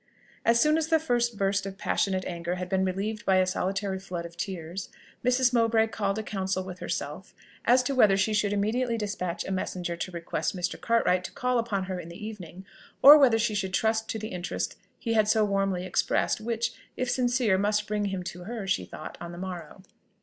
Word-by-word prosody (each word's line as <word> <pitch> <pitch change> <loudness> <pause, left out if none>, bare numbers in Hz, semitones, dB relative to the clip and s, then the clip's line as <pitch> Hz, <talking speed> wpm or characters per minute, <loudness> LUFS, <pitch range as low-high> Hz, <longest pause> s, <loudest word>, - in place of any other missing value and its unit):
As 235 0 +4
soon 305 +4 +4
as 315 - -1
the 320 - +4
first 240 -7 0
burst 195 0 0
of 195 0 -7
passionate 190 -1 0
anger 170 0 -3
had 180 0 -4
been 190 0 +1
relieved 200 +3 -2
by 190 - +3
a 185 0 +4
solitary 190 +1 -1
flood 180 -3 -5
of 170 0 -10
tears, 175 0 -5 0.3
Mrs. 250 0 +3
Mowbray 225 -1 +4
called 200 -2 -1
a 220 - -2
council 190 -2 -2
with 185 -1 -8
herself - - -5 0.3
as 250 +1 +5
to 275 - -1
whether 210 -7 +5
she 210 +2 +1
should 210 -1 +1
immediately 230 +4 0
despatch 200 -5 -3
a - - -4
messenger 180 -2 -2
to 175 - -4
request 170 +2 -3
Mr. 180 +1 -3
Cartwright 205 -6 +2
to - - -6
call 250 -1 0
upon 215 -4 -1
her 185 -1 -4
in 170 - -8
the 180 +5 -8
evening, 190 -4 -8 0.4
or 295 +2 +11
whether 250 -5 +5
she 225 -1 0
should 190 -2 -1
trust 220 +1 +1
to - - -2
the 215 0 -5
interest 180 0 -3 0.2
he 230 - -2
had 215 -2 +3
so 215 0 +4
warmly 195 -2 0
expressed, 185 +3 +1
which, 230 +1 -1 0.2
if 255 - -1
sincere, 245 -5 +2
must 210 +1 +1
bring 210 -1 -1
him 190 -2 -3
to 180 0 -7
her, 225 -1 -5
she 195 - 0
thought, - - -9
on 170 - -6
the 175 - -9
morrow. 185 +1 -7
200 Hz, 210 wpm, -27 LUFS, 185-230 Hz, 0.4 s, or